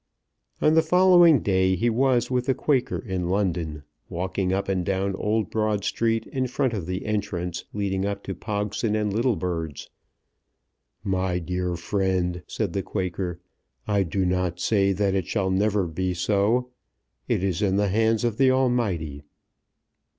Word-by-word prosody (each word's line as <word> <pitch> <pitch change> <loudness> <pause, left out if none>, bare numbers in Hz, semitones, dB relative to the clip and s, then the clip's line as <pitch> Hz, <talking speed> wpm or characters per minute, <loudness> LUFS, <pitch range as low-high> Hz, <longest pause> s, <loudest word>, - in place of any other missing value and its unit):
On 155 - +5
the 160 - +6
following 175 - +5
day 95 -1 +2
he 115 +7 0
was 125 +1 +2
with 125 0 0
the 135 - +2
Quaker 135 -5 0
in 90 -4 -3
London, 85 -6 -1 0.3
walking 95 +2 -2
up 95 +1 -1
and 95 -2 0
down 95 +1 -1
Old 105 0 -1
Broad 110 -2 0
Street 115 +1 0
in 130 -1 -2
front 130 0 0
of 95 -6 -4
the 90 +1 -3
entrance 95 -5 -3
leading 95 -2 -1
up 100 0 -3
to 95 - -4
Pogson 105 +1 -2
and 105 -2 -1
Littlebird's. 90 - -2 1.1
"My 95 -3 0
dear 90 0 -2
friend," 90 0 -1
said 100 -6 -3
the 100 - 0
Quaker, 90 -2 -3 0.5
"I 100 -1 +2
do 95 +1 -1
not 90 -1 -1
say 100 -1 +2
that 100 0 +1
it 95 -4 -1
shall 95 -3 0
never 100 0 +1
be 90 +2 -2
so. 105 +7 +1 0.6
It - - 0
is 95 -4 -1
in 95 -2 +2
the 100 0 +2
hands 110 +2 +2
of 115 -3 0
the 135 -1 +5
Almighty." 115 - 0
100 Hz, 160 wpm, -25 LUFS, 90-110 Hz, 1.1 s, the